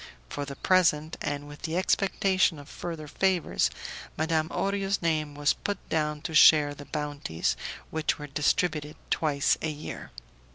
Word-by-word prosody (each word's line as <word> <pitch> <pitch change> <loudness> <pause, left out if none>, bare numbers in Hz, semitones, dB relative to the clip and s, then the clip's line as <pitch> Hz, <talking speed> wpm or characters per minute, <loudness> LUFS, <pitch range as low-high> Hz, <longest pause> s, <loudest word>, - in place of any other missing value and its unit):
For 145 - -4
the 140 0 -7
present, 165 -2 +2
and 145 0 -3
with 145 0 -11
the 165 0 -2
expectation 190 -2 +2
of 145 -1 -11
further 165 -3 -6
favours, 180 - +1 0.5
Madame 160 0 +1
Orio's 195 +1 0
name 155 -3 0
was 145 0 +2
put 205 -1 -3
down 150 -1 0
to 160 - -4
share 150 -1 +7
the 145 0 -10
bounties 145 - -2 0.4
which 160 -1 0
were 150 - -7
distributed 150 +1 0 0.2
twice 145 -3 +2
a 160 - -1
year. 150 0 -7
155 Hz, 150 wpm, -28 LUFS, 145-170 Hz, 0.5 s, share